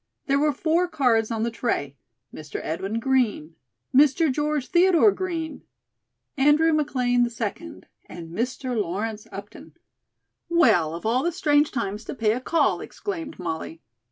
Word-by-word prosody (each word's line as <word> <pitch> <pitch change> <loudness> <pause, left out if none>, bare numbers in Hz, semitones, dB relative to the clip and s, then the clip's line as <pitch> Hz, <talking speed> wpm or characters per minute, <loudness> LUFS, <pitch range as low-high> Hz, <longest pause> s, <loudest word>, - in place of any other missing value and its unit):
There 275 0 +2
were 300 +1 +3
four 330 +5 +1
cards 250 -9 +1
on 225 -2 -2
the 235 - -1
tray: 185 - -2 0.4
"Mr. 150 -2 -7
Edwin 195 +8 -3
Green," 230 - 0 0.4
"Mr. 290 +3 +4
George 295 0 -1
Theodore 365 +3 +5
Green," 330 -6 -4 0.7
"Andrew 295 +4 +4
McLean, 250 -5 +1
2d," 210 - -5 0.2
and 165 -1 -9
"Mr. 250 +5 -3
Lawrence 210 +2 -3
Upton." 200 +1 -10 0.8
"Well, 215 - +3
of 170 - -8
all 235 +4 +2
the 345 - 0
strange 295 -4 +2
times 210 -3 -3
to - - -6
pay 220 -4 +1
a 250 - -3
call," 330 +5 +1
exclaimed 330 -6 -6
Molly. 165 -2 -5
250 Hz, 140 wpm, -24 LUFS, 210-305 Hz, 0.8 s, Theodore